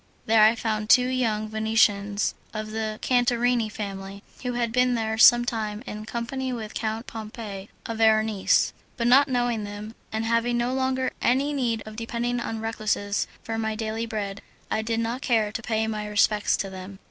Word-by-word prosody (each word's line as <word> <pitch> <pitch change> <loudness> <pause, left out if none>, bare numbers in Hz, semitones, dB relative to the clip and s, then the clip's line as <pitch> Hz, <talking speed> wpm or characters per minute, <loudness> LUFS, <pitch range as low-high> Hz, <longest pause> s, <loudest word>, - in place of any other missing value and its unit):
There 225 -2 +5
I 220 +2 +6
found 215 -2 -2
two 250 +1 +6
young 225 -4 0
Venetians 215 -2 +1 0.2
of 215 0 -4
the 220 -1 -3
Cantarini 245 -2 +2
family, 200 -1 -6 0.2
who 250 -1 -2
had 240 -2 -1
been 250 +1 +3
there 220 -1 -1
some 240 +2 +8
time 215 -2 -3
in 215 -2 -7
company 255 +3 -3
with 220 -3 -5
Count 220 +1 -3
Pompei, 215 -3 -7 0.2
a 230 - -3
Veronese; 220 -2 +3 0.2
but 235 - -1
not 270 +4 +6
knowing 245 -4 0
them, 205 +1 -7 0.2
and 220 +1 -2
having 230 +1 +1
no 240 +1 0
longer 260 0 0
any 275 +4 +2
need 235 -6 -1
of 215 0 -9
depending 235 +2 -2
on 225 -1 -4
recluses 215 -2 -1 0.2
for 225 0 -3
my 220 -1 -1
daily 220 +1 -3
bread, 205 -3 -4 0.3
I 215 - +1
did 225 +1 -1
not 230 +3 -2
care 220 -6 +1
to 225 - -4
pay 220 -1 0
my 215 -1 -3
respects 210 0 +2
to 195 - -3
them. 190 +1 -9
225 Hz, 180 wpm, -25 LUFS, 215-240 Hz, 0.3 s, some